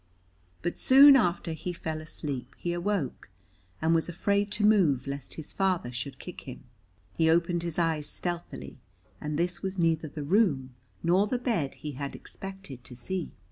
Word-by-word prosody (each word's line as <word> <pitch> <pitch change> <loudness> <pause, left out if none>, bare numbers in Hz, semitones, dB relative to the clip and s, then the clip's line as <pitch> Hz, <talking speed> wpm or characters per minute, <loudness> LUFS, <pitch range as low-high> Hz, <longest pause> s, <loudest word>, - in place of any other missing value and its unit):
But 175 - -2
soon 275 +2 +9
after 175 -8 +2
he 170 +3 -4
fell 160 -2 -4
asleep 140 -4 -5
he 175 - -2
awoke, 175 - -2 0.5
and 165 +1 +4
was 165 +1 +2
afraid 200 +4 +1
to 210 - +1
move 170 - +4
lest 140 -1 -5
his 160 - -8
father 185 -10 0
should 125 +2 -5
kick 180 +5 -9
him. 130 - -8 0.5
He 160 0 +3
opened 170 +1 +2
his 170 -2 -2
eyes 160 -3 +1
stealthily, 175 -6 -4 0.4
and 150 0 -2
this 175 +1 -1
was 190 0 -3
neither 165 -2 +2
the 150 0 -6
room 145 - +2 0.3
nor 180 +5 +4
the 250 - 0
bed 220 - -1
he 150 - -6
had 140 0 -5
expected 190 -10 -9
to 125 - -10
see. 180 +8 -4
170 Hz, 170 wpm, -29 LUFS, 145-190 Hz, 0.5 s, soon